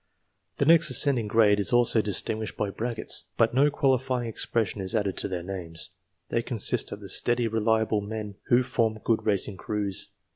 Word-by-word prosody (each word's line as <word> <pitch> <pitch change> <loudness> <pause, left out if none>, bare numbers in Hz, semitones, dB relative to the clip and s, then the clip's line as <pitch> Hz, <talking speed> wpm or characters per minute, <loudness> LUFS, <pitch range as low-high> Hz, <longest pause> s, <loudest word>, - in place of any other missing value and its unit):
The 140 - +1
next 165 +1 +5
ascending 130 -7 +2
grade 105 -1 +4
is 100 - 0
also 120 -2 +4
distinguished 110 +1 -2
by 100 -2 -1
brackets 115 +3 -1
[ - - -44
], - - -45
but 115 +1 +3
no 140 +3 +4
qualifying 130 -4 0
expression 110 -2 -1
is 95 +4 -3
added 100 -3 0
to - - 0
their 90 -2 -4
names. 90 -2 -6 0.4
They 115 - 0
consist 115 -3 -1
of - - -7
the - - -9
steady, 120 -1 +1
reliable 110 -1 +1
men 105 0 -6
who 125 +1 +4
form 115 -3 0
good 115 -1 0
racing 100 -1 +1
crews. 100 -1 -3
110 Hz, 185 wpm, -26 LUFS, 100-120 Hz, 0.4 s, next